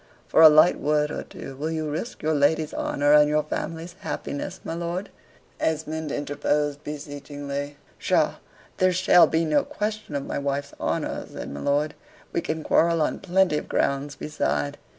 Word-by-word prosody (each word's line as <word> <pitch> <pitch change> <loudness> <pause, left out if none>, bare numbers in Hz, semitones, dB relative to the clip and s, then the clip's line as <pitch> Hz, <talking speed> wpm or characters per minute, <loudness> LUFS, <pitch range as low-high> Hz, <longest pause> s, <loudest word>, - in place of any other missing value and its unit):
"For - - +4
a 160 - +11
light 155 +3 +5
word 150 0 +1
or - - -3
two, 135 - -9
will 150 +4 -3
you 160 -1 -2
risk 155 +11 -5
your 155 +1 +2
lady's 150 +1 +2
honor 145 +1 +1
and 150 0 +6
your 150 0 +2
family's 165 +3 -5
happiness, 185 +6 -5
my - - -4
lord?" 170 +3 -4 0.5
Esmond 160 -1 -2
interposed 145 0 -1
beseechingly. 145 -1 -6 0.2
"Psha - - +2 0.4
there 185 0 +3
shall 180 -1 +6
be 165 +1 +1
no 150 -2 +2
question 210 -6 -4
of 140 - -2
my - - -3
wife's 140 0 -2
honor," - - -2
said - - -7
my 70 - -6
lord; 145 - 0 0.4
"we - - +1
can 160 -1 -3
quarrel 165 +2 +3
on 155 - 0
plenty 190 -4 +2
of - - -11
grounds 140 +1 0
beside. 75 - -2
150 Hz, 170 wpm, -25 LUFS, 145-165 Hz, 0.5 s, a